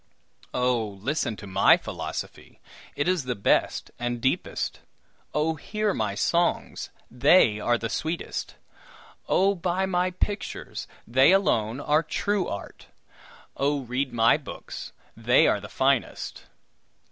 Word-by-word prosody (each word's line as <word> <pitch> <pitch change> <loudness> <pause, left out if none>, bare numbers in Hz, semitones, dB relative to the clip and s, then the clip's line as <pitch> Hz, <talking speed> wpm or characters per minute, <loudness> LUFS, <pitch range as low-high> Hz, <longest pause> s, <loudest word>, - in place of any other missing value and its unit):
Oh! 120 -5 0
listen 135 0 -1
to 105 - -10
my 95 - +5
philosophy, - - -7 0.4
it 145 - -1
is 180 -6 +1
the 125 -1 -2
best 100 - +1
and 120 0 -2
deepest. 130 +3 -1 0.5
Oh! 155 +2 +1
hear 210 +6 -2
my 105 -2 -1
songs, 170 +10 0 0.2
they 125 - +5
are 120 +3 +2
the 115 - -3
sweetest. 160 +9 -4 0.7
Oh! 195 +2 +4
buy 185 +1 -1
my 180 -1 +1
pictures, 200 +3 -4 0.2
they 130 +7 +5
alone 120 - +2
are 150 +2 +2
true 190 +4 -1
art. 100 - -7 0.7
Oh! 145 +1 0
read 130 +2 -2
my 115 0 +4
books, - - -8 0.2
they - - +4
are - - +2
the - - -9
finest. - - -1
140 Hz, 125 wpm, -26 LUFS, 115-175 Hz, 0.7 s, my